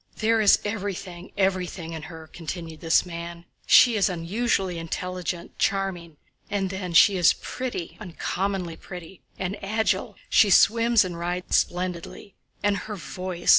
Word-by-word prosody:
"There 225 0 +2
is 205 - +6
everything, 195 -4 -5
everything 185 -3 -1
in 160 - -5
her," 160 0 -10
continued 165 0 -7
this 165 +1 +3
man. 170 0 -7 0.2
"She 240 -2 +7
is 205 -1 +3
unusually 185 +1 -1
intelligent, 175 +1 -5
charming... 180 -5 -1 0.3
and 195 -2 -1
then 185 -2 -4
she 195 +4 +6
is 175 - +5
pretty, 245 -10 -5
uncommonly 185 -2 -3
pretty, 180 0 -10 0.2
and 190 +2 -4
agile—she 215 0 +1
swims 230 +2 +5
and 175 -2 -5
rides 175 +1 0
splendidly... 180 +2 -3 0.3
and 205 -1 +2
her 210 +2 -6
voice! 185 -1 -5
185 Hz, 135 wpm, -25 LUFS, 170-200 Hz, 0.3 s, She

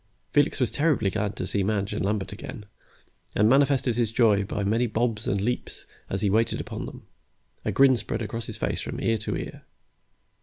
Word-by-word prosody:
Felix 145 0 +3
was 125 - +2
terribly 145 -10 +2
glad 105 0 -2
to - - -3
see 100 - +1
Madge 100 0 0
and 105 - -2
Lambert 100 0 -1
again, 105 0 -8 0.7
and 105 - +4
manifested 135 -2 +3
his 115 -3 +1
joy 110 -4 +4
by 100 +1 -3
many 115 +5 +2
bobs 110 0 -1
and 100 - +1
leaps 120 +5 -3 0.2
as 95 - -2
he 105 - +2
waited 115 +2 +2
upon - - -5
them. - - -10 0.6
A - - +1
grin 135 -1 +6
spread 115 0 -3
across 115 +1 -4
his - - -6
face - - -1
from - - -5
ear 115 -1 +1
to 110 - -2
ear. - - -7
110 Hz, 195 wpm, -26 LUFS, 105-120 Hz, 0.7 s, grin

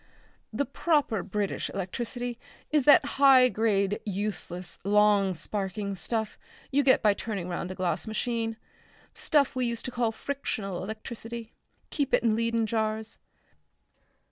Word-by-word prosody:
The 255 +6 -1
proper 280 - +1
British 205 0 -2
electricity 240 +5 -4 0.3
is 300 -4 +3
that 290 - +7 0.2
high 260 -2 +8
grade 205 -3 +1
useless 190 -3 -4
long 205 -1 +4
sparking 200 +2 -3
stuff 220 +3 -3 0.3
you 280 +1 +4
get 260 -4 +4
by 210 -1 +5
turning 200 -4 -4
round 175 0 -3
a 185 - -5
glass 180 +1 -1
machine; 225 0 -2 0.6
stuff 285 -4 +2
we 255 -1 +1
used 235 -1 -4
to 255 - -4
call 240 -2 0
frictional 220 -7 -4
electricity. 225 +2 -7 0.4
Keep 285 -3 +1
it - - 0
in 225 -2 +3
Leyden 230 0 +1
jars.... 220 0 -2
220 Hz, 135 wpm, -28 LUFS, 200-245 Hz, 0.6 s, high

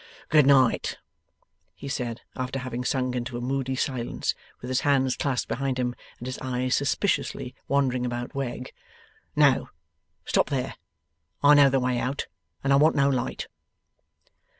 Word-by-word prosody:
'Good 150 -3 +5
night,' 130 -4 +4 0.8
he 140 - -8
said, 120 -3 -3
after 130 +1 -3
having 125 -1 -4
sunk 125 -1 0
into 120 0 -3
a - - -3
moody 130 +1 -1
silence, 130 -3 -1 0.3
with 125 - -7
his 130 - +2
hands 135 -3 +2
clasped 135 -4 -1
behind 135 0 -1
him, 125 -1 0 0.2
and 120 - -9
his 130 +1 -4
eyes 130 0 -1
suspiciously 140 -3 0
wandering 130 -3 +1
about 120 0 -3
Wegg. 130 -2 -4 0.6
'No! - - +4 0.6
stop - - +2
there. - - -1 0.7
I 145 +1 +8
know 145 -1 +7
the 135 0 +2
way 125 -1 0
out, 135 +4 -2 0.4
and 140 0 +3
I - - +6
want 155 +3 +5
no 140 -1 +4
light. 130 -3 -2
130 Hz, 150 wpm, -26 LUFS, 125-140 Hz, 0.8 s, I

